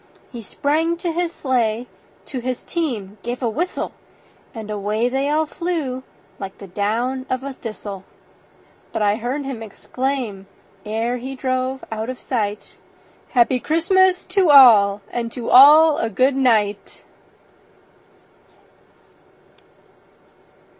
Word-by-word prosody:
He 240 - -8
sprang 315 +9 -1
to 345 0 -3
his 340 0 -1
sleigh, 240 -6 -1 0.4
to 260 - -5
his 250 0 -4
team 220 - -4
gave 245 +4 -5
a - - +1
whistle, 320 +11 -3 0.6
And 220 -2 -8
away 210 +3 -1
they 270 +2 -1
all 310 +1 +1
flew 310 -6 -3 0.4
like 195 -1 -7
the 200 - -10
down 230 +7 -2
of 255 0 -2
a 275 0 -5
thistle; 210 -5 -8 0.9
But 225 - -1
I 205 0 +2
heard 255 +5 -3
him 265 -4 -5
exclaim, 225 -2 -4 0.4
ere 225 +3 -1
he 260 +2 -7
drove 260 0 -2
out 220 +2 -4
of 255 - -6
sight, 210 -5 -4 0.5
"Happy 250 0 +3
Christmas 370 +5 +2
to 370 -2 +2
all, 215 -8 +7
and 235 -1 -3
to 240 -2 -4
all 300 +4 +8
a 225 - -1
good 255 +6 +2
night!" 215 -6 0
250 Hz, 125 wpm, -21 LUFS, 220-280 Hz, 0.9 s, all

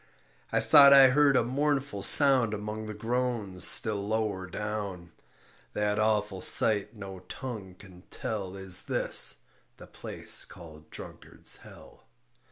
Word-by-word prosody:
I - - -1
thought 140 -1 +6
I 135 -1 +6
heard 140 +1 +1
a 125 - +1
mournful 135 -3 -3
sound 130 -1 +5
Among 105 +1 -8
the 110 - -9
groans 115 -4 -2
still 100 -2 +1
lower 105 -4 -4
down, 100 -3 -7 0.6
That 105 0 -3
awful 105 -3 -2
sight 105 +1 +3
no 95 -3 -11
tongue 110 -8 -9
can 90 -2 -17
tell 100 -4 -7
Is 95 -2 0
this, - - +1 0.4
the - - -14
place - - -2
called 80 -2 -13
Drunkard's - - -9
Hell. - - -18
105 Hz, 130 wpm, -26 LUFS, 95-125 Hz, 0.6 s, thought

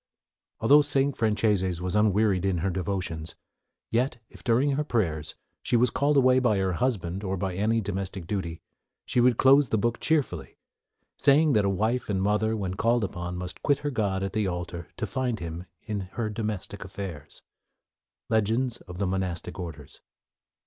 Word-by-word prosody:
"Although 145 +7 +7
St. 140 -1 +1
Franceses 105 -5 +1
was 90 0 -3
unwearied 105 -2 +3
in 95 -2 +1
her 95 - +1
devotions, 90 -4 -3 0.6
yet 125 +3 +1
if, - - -14
during 125 +5 +3
her 145 +2 0
prayers, 80 - -1 0.3
she 120 - +2
was 125 +1 +3
called 145 +2 +2
away 130 -1 +5
by 120 -5 +2
her 95 -1 0
husband 100 -4 -1
or 95 -1 -2
any 110 +5 +1
domestic 95 -2 -4
duty, 85 -3 -4 0.4
she 125 - +1
would 120 -1 +4
close 135 0 +6
the 110 - +2
book 120 +3 0
cheerfully, 155 -4 -1 0.6
saying 145 +1 +4
that 105 -3 +3
a - - +2
wife 110 +6 0
and 100 - +1
a - - 0
mother, 105 +2 +1
when 95 -3 -3
called 115 +4 +2
upon, 90 -2 -4
must 90 0 -6
quit 145 -2 +2
her 145 - 0
God 100 -6 -1
at 95 - -3
the 110 -2 0
alter 85 -1 -4
to 115 - -2
find 125 +3 -1
Him 85 +1 -6 0.2
in 105 -2 -3
her 110 -2 -2
domestic 105 -2 -4
affairs." 95 -6 -8 0.8
Legends 115 +3 +1
of 90 -1 -8
the 100 - 0
Monastic 90 -1 -3
Orders. 80 -5 -8
105 Hz, 170 wpm, -27 LUFS, 90-120 Hz, 0.8 s, Although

